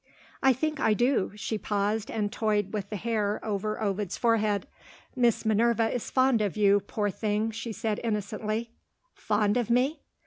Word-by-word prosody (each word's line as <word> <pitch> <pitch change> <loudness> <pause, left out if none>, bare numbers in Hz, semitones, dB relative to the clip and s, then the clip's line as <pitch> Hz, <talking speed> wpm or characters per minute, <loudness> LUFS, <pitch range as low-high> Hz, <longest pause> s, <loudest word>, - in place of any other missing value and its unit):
"I 265 - +6
think 305 +4 -1
I 220 -4 +3
do." 245 -3 +1
She 210 +1 -3
paused, 205 +2 -1
and 210 -2 -1
toyed 210 -2 0
with 200 -2 -3
the 215 - -4
hair 210 -1 -1
over 215 0 -2
Ovid's 205 -3 -2
forehead. 215 -3 +1 0.5
"Miss 240 -3 +2
Minerva 225 +1 +2
is 245 - -3
fond 260 -3 +3
of 205 -1 -1
you, 205 -1 +5
poor 205 +1 -2
thing," 215 +2 -1
she 230 +1 -5
said 215 -1 -2
innocently. 215 +1 -2 0.4
"Fond 210 0 +1
of 240 -2 -1
me?" 255 +6 +2
215 Hz, 165 wpm, -28 LUFS, 205-230 Hz, 0.5 s, I